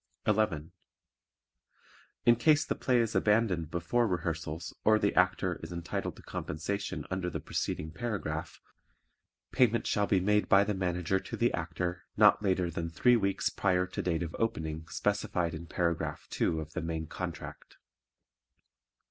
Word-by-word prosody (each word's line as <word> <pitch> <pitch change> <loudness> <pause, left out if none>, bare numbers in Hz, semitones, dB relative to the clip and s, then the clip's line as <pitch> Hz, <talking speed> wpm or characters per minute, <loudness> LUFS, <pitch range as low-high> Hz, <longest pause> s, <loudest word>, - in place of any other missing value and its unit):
11. 100 -8 +1 1.5
In 120 - +7
case 150 +6 +4
the - - 0
play 125 -2 +1
is 115 -2 +1
abandoned 105 -7 +2
before 85 +9 +1
rehearsals 80 -3 -3
or 110 0 +5
the 100 -1 +1
Actor 90 -1 +2
is 80 - -7
entitled 85 -1 -4
to - - -15
compensation 100 +6 -4
under 95 -1 -1
the - - -4
preceding 80 +1 -3
paragraph, 90 -6 -4 0.9
payment 115 -2 +3
shall 105 -1 +1
be 95 - +3
made 105 +3 +2
by 100 0 +7
the 105 - -1
Manager 90 -1 0
to - - -7
the 120 0 +2
Actor 85 +1 -3
not - - +6
later 95 -4 +1
than 85 0 -3
three 120 +9 +4
weeks 100 -4 0
prior 90 -2 +1
to 90 - -4
date 85 -1 0
of 80 - -6
opening 80 -7 -2
specified 90 -3 -1
in 85 +1 -7
Paragraph 85 -2 -1
2 80 - 0
of 80 +1 -7
the 90 - -2
main 80 -1 -3
contract. - - -7
90 Hz, 150 wpm, -31 LUFS, 80-105 Hz, 1.5 s, In